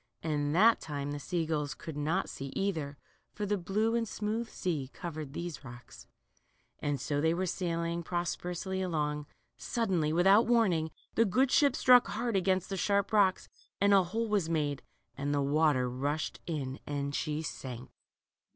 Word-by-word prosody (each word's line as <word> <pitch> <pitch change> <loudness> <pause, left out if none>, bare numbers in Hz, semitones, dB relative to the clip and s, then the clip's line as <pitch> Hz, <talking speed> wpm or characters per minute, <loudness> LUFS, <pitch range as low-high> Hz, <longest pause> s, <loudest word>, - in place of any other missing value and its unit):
And 150 -1 0
that 225 +5 +6
time 145 -2 -4
the 145 - -4
sea 170 +2 -2
gulls 150 -2 -2
could 160 - -8
not 155 +6 0
see 135 - -6
either, 160 -8 -2 0.4
for 210 - -3
the 205 +1 +1
blue 205 +5 0
and 230 -1 0
smooth 220 +3 -3
sea 150 -8 -3
covered 155 -5 -6
these 170 -2 -5
rocks. 120 -1 -12 0.7
And 145 -1 -1
so 145 +3 -2
as - - +1
they 160 +2 +2
were 185 +2 0
sailing 170 -1 -2
prosperously 175 +2 -3
along, 150 -4 -1 0.3
suddenly, 185 -10 0
without 195 +7 +5
warning, 190 -10 +3 0.2
the 225 - +4
good 255 +6 +2
ship 285 -2 +4
struck 250 -1 +6
hard 230 +1 -2
against 190 0 +1
the 195 - -3
sharp 200 +2 +1
rocks, 195 -3 +3 0.3
and 200 +1 +4
a 195 -2 +5
hole 225 +6 -2
was 200 -6 +1
made, 145 -4 0 0.3
and 145 +1 -1
the 145 - +1
water 145 -3 +2
rushed 140 +5 -2
in 140 -5 -3
and 140 -1 -2
she 155 +1 -2
sank. 125 -4 -7
170 Hz, 170 wpm, -31 LUFS, 145-195 Hz, 0.7 s, that